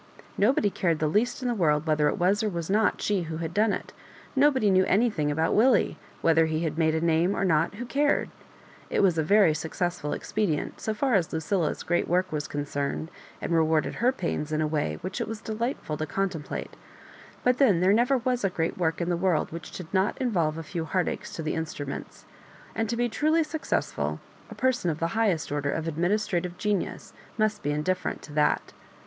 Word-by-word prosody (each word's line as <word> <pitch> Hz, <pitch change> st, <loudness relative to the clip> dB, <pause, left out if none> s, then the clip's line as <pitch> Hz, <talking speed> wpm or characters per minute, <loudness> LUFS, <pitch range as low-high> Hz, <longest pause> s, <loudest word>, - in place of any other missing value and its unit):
Nobody 210 Hz, -1 st, +3 dB
cared 170 Hz, -4 st, 0 dB
the 155 Hz, -, 0 dB
least 235 Hz, -, 0 dB
in -, -, 0 dB
the 240 Hz, -, +1 dB
world 155 Hz, -7 st, +2 dB
whether 155 Hz, -2 st, +2 dB
it -, -, 0 dB
was 195 Hz, +5 st, +2 dB
or 215 Hz, -, 0 dB
was 170 Hz, -1 st, -4 dB
not 215 Hz, +1 st, +2 dB
she 205 Hz, -3 st, +1 dB
who 160 Hz, -, -3 dB
had 165 Hz, 0 st, -4 dB
done 215 Hz, +2 st, +3 dB
it -, -, -4 dB, 0.4 s
Nobody 265 Hz, -7 st, +4 dB
knew 185 Hz, 0 st, +5 dB
anthing 200 Hz, -8 st, +2 dB
about 160 Hz, +2 st, +1 dB
Willie; 240 Hz, +3 st, +4 dB, 0.3 s
whether 165 Hz, -1 st, +4 dB
he 160 Hz, +1 st, -1 dB
made 160 Hz, 0 st, +1 dB
a 160 Hz, -, 0 dB
Name 170 Hz, +3 st, +2 dB
or 195 Hz, -, 0 dB
no^ 165 Hz, -2 st, +2 dB
who 240 Hz, +4 st, -5 dB
cared? 285 Hz, +5 st, +1 dB, 0.6 s
It -, -, +1 dB
was 180 Hz, -4 st, +3 dB
a -, -, +2 dB
very 200 Hz, -1 st, +5 dB
suc 155 Hz, +1 st, -5 dB
cessful 175 Hz, -4 st, -2 dB
expedient, 190 Hz, -8 st, -2 dB
so 220 Hz, -, -2 dB
far 260 Hz, +3 st, +1 dB
as 180 Hz, -6 st, +2 dB
Lucilla's 160 Hz, +2 st, -1 dB
great 175 Hz, 0 st, 0 dB
work 185 Hz, +2 st, +1 dB
was 150 Hz, -2 st, -2 dB
concerned, 145 Hz, +2 st, -3 dB, 0.3 s
and -, -, -4 dB
rewarded 160 Hz, -1 st, +2 dB
her 250 Hz, +2 st, +4 dB
pains 165 Hz, -, -3 dB
in 155 Hz, -, 0 dB
a 155 Hz, -, +2 dB
way 150 Hz, -, -1 dB
which 185 Hz, -, -4 dB
it -, -, -2 dB
was 225 Hz, -1 st, -5 dB
delightful 220 Hz, -, -3 dB
to 155 Hz, -, -3 dB
contemplate; 175 Hz, -2 st, -3 dB, 0.7 s
but 250 Hz, 0 st, +2 dB
then 215 Hz, -11 st, +5 dB
there 185 Hz, +3 st, +4 dB
never 245 Hz, +5 st, +3 dB
was 250 Hz, -1 st, -1 dB
a 195 Hz, -, +3 dB
great 165 Hz, 0 st, -2 dB
work 165 Hz, 0 st, 0 dB
in 170 Hz, -, -1 dB
the 175 Hz, -, +2 dB
world 175 Hz, -2 st, +1 dB
which 165 Hz, +1 st, -7 dB
did 180 Hz, -, -7 dB
not 190 Hz, +2 st, +1 dB
involve 170 Hz, -, 0 dB
a 165 Hz, -, -5 dB
few 165 Hz, +1 st, -4 dB
heartaches 180 Hz, +3 st, -2 dB
to 165 Hz, -, -5 dB
the 155 Hz, -, -1 dB
instruments; 150 Hz, -3 st, -5 dB, 0.5 s
and 225 Hz, -1 st, -1 dB
to 235 Hz, -, -1 dB
be 240 Hz, 0 st, +2 dB
truly 310 Hz, +8 st, +2 dB
successful 305 Hz, -2 st, -2 dB, 0.3 s
a -, -, -9 dB
person 255 Hz, -8 st, +1 dB
of 155 Hz, -, -2 dB
the 165 Hz, +1 st, -1 dB
highest 205 Hz, -10 st, +1 dB
order 145 Hz, -1 st, -1 dB
of 160 Hz, +3 st, -2 dB
administrative 175 Hz, +1 st, -1 dB
genius 205 Hz, -2 st, -2 dB, 0.2 s
must 215 Hz, -1 st, +1 dB
be -, -, -2 dB
indifferent 150 Hz, +5 st, -1 dB
to 150 Hz, -, -11 dB
that. 150 Hz, 0 st, +1 dB
180 Hz, 205 wpm, -27 LUFS, 160-215 Hz, 0.7 s, knew